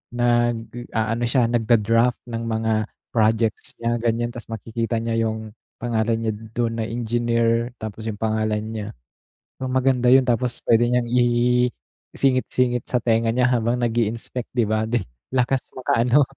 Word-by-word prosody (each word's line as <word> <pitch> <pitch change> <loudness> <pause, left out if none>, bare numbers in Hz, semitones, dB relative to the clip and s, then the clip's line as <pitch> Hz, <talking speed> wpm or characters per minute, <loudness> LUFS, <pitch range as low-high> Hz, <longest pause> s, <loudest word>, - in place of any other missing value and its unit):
nag-aano 120 -1 0
siya, 120 -1 +3
nag-da-draft 115 +1 +2
ng 115 -1 -4
mga 110 0 0 0.4
projects 115 +2 +1
niya, 115 0 0
ganiyan, 120 +1 0
ta's 120 -1 -9
makikita 115 +1 -2
niya 115 0 -2
'yung 110 -1 -5 0.3
pangalan 115 -1 0
niya 110 -1 0 0.2
dun 115 -1 0
na - - 0
engineer, 115 0 0
tapos 110 0 -6
'yung 105 -2 -4
pangalan 110 -1 0
niya. 110 -2 -4 0.7
Maganda 130 -1 +2
'yun, 130 0 +6
tapos 125 0 0
puwede 115 +1 +4
niyang 125 0 +2
i 125 0 +3 0.5
i-singit-singit 125 -2 +1
sa 125 - +2
tenga 115 -1 +2
niya 125 +1 +3
habang 120 -1 +1
nag-i-inspect, 115 +1 -2
'di 115 - +4
ba. 110 0 +1 0.5
Lakas 130 0 +1
maka 125 -2 +1
ano, 135 +4 +5
115 Hz, 140 wpm, -23 LUFS, 115-125 Hz, 0.7 s, yun